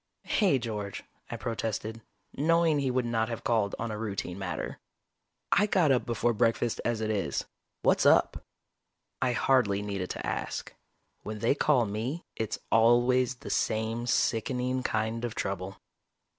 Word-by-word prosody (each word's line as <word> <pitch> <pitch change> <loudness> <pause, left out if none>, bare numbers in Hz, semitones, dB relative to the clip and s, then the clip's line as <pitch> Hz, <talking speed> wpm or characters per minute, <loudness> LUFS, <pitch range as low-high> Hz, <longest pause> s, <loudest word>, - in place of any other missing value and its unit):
"Hey, 190 - +3
George," 105 -5 -4 0.3
I 120 - -4
protested, 110 -1 -3 0.3
knowing 165 0 +3
he 135 -2 0
would 125 -1 0
not 115 -1 0
have 115 - -5
called 110 -4 +1
on 115 -1 -3
a 105 - -4
routine 100 -4 -4
matter. 95 -2 -4 0.7
"I 210 - +4
got 175 -8 +3
up 125 - +1
before 120 0 +1
breakfast 115 +1 +1
as 115 -2 -1
it 110 0 0
is. 95 -10 -1 0.4
What's - - +4
up?" - - +4 0.8
I 125 -1 +2
hardly 115 -6 +2
needed 100 -3 -3
to - - -5
ask. - - -3 0.5
When 110 0 -5
they 115 +5 +2
call 140 -4 +3
me, 115 - -3
it's 110 -1 -2
always 120 +2 +4
the - - -8
same 110 +2 0
sickening 125 +3 +1
kind 110 -1 -1
of 120 -2 -3
trouble. 95 0 -4
115 Hz, 150 wpm, -29 LUFS, 110-125 Hz, 0.8 s, I